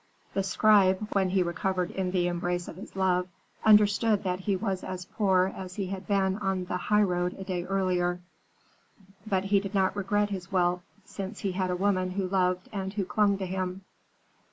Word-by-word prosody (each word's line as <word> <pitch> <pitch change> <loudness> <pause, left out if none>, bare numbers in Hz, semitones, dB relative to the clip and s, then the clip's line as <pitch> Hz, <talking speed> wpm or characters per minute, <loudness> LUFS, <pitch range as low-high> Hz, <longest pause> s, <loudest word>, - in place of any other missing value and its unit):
The 195 - +1
scribe, 195 0 +3
when 190 -2 +2
he 185 0 +2
recovered 180 +1 -1
in 190 -1 -2
the 180 -1 +1
embrace 175 0 -2
of - - -8
his 195 - -11
love, 180 -1 +1 0.4
understood 210 0 +4
that 180 -1 -1
he 195 +1 0
was 190 -1 -2
as 185 -1 -5
poor 190 -2 +1
as 185 -1 -7
he 200 - -2
had 190 0 -6
been 195 -1 +1
on 190 -2 -1
the 180 - -3
highroad 180 -3 +1
a 195 - -6
day 180 -2 -3
earlier. 180 -2 0 1.1
But 190 -3 +1
he 200 0 +3
did 195 +1 -6
not 190 0 +2
regret 205 +1 0
his 185 -3 -5
wealth, 180 -1 +2 0.2
since 200 +1 -7
he 195 - -1
had 185 0 -1
a 180 - 0
woman 185 -1 +1
who 185 0 -2
loved 185 -1 0
and 190 -1 -3
who 200 -3 -1
clung 200 +1 +2
to 190 - -3
him." 185 0 -3
190 Hz, 190 wpm, -28 LUFS, 180-195 Hz, 1.1 s, understood